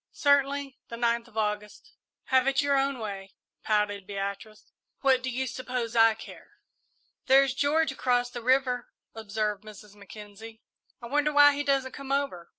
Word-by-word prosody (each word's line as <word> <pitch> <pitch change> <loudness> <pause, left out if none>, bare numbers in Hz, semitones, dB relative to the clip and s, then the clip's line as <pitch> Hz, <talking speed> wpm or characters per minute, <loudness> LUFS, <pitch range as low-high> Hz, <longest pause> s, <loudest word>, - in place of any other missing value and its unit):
"Certainly 280 -1 +1
the 235 - -7
ninth 235 0 0
of 225 -2 -16
August." 210 - -3 0.4
"Have 260 0 +4
it 270 -1 +2
your 285 -1 +2
own 275 0 +1
way," 195 -4 -7 0.3
pouted 205 -2 -1
Beatrice; 200 +2 -6 0.3
"what 265 -2 +3
do 260 - -3
you 260 +1 -2
suppose 250 -2 -4
I 225 -1 +5
care?" - - -13 0.7
"There's 270 0 +5
George 285 +2 +1
across 245 -2 0
the 240 - -6
river," 255 0 +1 0.2
observed 215 -1 -3
Mrs. 210 -1 -13
Mackenzie. 210 +2 -12 0.4
"I - - -5
wonder 295 +4 +1
why 290 0 +7
he 285 - -2
doesn't 275 -2 0
come 275 0 -8
over!" 275 -12 -2
245 Hz, 155 wpm, -27 LUFS, 215-275 Hz, 0.7 s, why